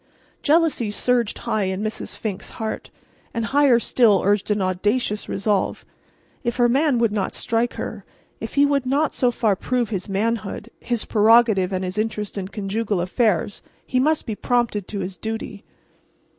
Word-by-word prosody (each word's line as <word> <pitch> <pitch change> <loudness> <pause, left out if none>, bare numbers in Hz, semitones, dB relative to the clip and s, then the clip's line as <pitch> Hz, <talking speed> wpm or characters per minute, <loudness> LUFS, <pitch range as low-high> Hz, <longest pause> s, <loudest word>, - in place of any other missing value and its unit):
Jealousy 310 -7 +2
surged 235 +1 0
high 210 -2 -1
in 190 +2 -2
Mrs. 215 0 -4
Fink's 205 -4 -5
heart, 220 -1 -4 0.5
and 230 -1 -1
higher 275 -1 +4
still 230 -4 +3
surged 205 +1 +1
an 210 0 +1
audacious 205 +4 -1
resolve. 200 0 -1 0.6
If 235 -1 -1
her 240 -1 +4
man 275 +2 +2
would 230 -2 +2
not 205 -2 -2
strike 230 +1 0
her—if - - -8
he 285 0 +5
would 280 -2 +1
not 285 +3 +1
so 250 - +2
far 225 -4 +1
prove 240 +3 -1
his 195 -1 -3
manhood, 215 +2 -2
his 240 -2 -2
prerogative 215 -3 +4
and 185 0 -2
his 185 +3 -3
interest 215 -1 -2
in 195 -2 -3
conjugal 205 0 -2
affairs, 190 +1 0 0.2
he 255 - 0
must 305 +4 +2
be 220 - -3
prompted 230 -3 0
to 200 -2 -4
his 185 0 -5
duty. 220 -2 -5
220 Hz, 160 wpm, -22 LUFS, 200-240 Hz, 0.6 s, he